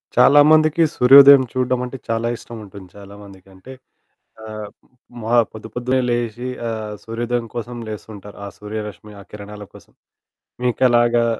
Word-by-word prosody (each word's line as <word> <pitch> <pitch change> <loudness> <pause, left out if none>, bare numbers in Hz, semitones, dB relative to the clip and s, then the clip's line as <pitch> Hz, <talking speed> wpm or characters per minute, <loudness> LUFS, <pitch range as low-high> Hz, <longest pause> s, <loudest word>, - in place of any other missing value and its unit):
చాలామందికి 155 +2 +5
సూర్యోదయం 135 +1 +8
చూడడం 130 -1 -1
అంటే 130 +1 -8
చాలా 115 +1 -1
ఇష్టముంటుంది 100 -5 -12
చాలామందికి. 100 -1 -14
అంటే 95 +8 -14 0.7
ఆహ్, 110 -1 -8 0.5
మా 115 +2 -1 0.2
పొద్దుపొద్దున్నే 120 +4 -3
లేశి 120 +1 -3 0.2
ఆహ్, 110 -2 -5
సూర్యోదయం 120 +1 -3
కోసం 120 +1 -6
లేస్తూ 110 0 -8
ఉంటారు. 100 0 -13
ఆ - - -6
సూర్యరశ్మి 105 0 -8
ఆ - - -12
కిరణాల 105 0 -10
కోసం. - - -17 0.7
మీకలాగా 120 -1 +2
115 Hz, 120 wpm, -19 LUFS, 105-125 Hz, 0.7 s, సూర్యోదయం